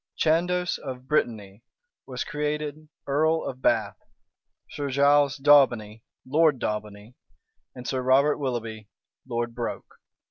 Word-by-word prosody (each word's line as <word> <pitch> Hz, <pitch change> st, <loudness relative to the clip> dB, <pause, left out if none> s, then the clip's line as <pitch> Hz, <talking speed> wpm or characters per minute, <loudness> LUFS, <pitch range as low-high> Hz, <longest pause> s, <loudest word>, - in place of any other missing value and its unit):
Chandos 180 Hz, +3 st, +1 dB
of 130 Hz, -2 st, -8 dB
Brittany 110 Hz, -8 st, -1 dB, 0.5 s
was 125 Hz, -2 st, -4 dB
created 150 Hz, +1 st, -4 dB, 0.2 s
earl 160 Hz, +3 st, +1 dB
of 130 Hz, 0 st, -6 dB
Bath, -, -, +1 dB, 0.7 s
Sir 145 Hz, -1 st, -4 dB
Giles 140 Hz, +1 st, +3 dB
Daubeny, 125 Hz, -7 st, +4 dB, 0.2 s
Lord 150 Hz, +2 st, +3 dB
Daubeny, 105 Hz, 0 st, -5 dB, 0.6 s
and 125 Hz, -1 st, -8 dB
Sir 130 Hz, -, -1 dB
Robert 135 Hz, +4 st, +3 dB
Willoughby, 115 Hz, -5 st, -4 dB, 0.4 s
Lord 120 Hz, -1 st, -3 dB
Broke. 120 Hz, 0 st, -6 dB
135 Hz, 110 wpm, -26 LUFS, 120-150 Hz, 0.7 s, Daubeny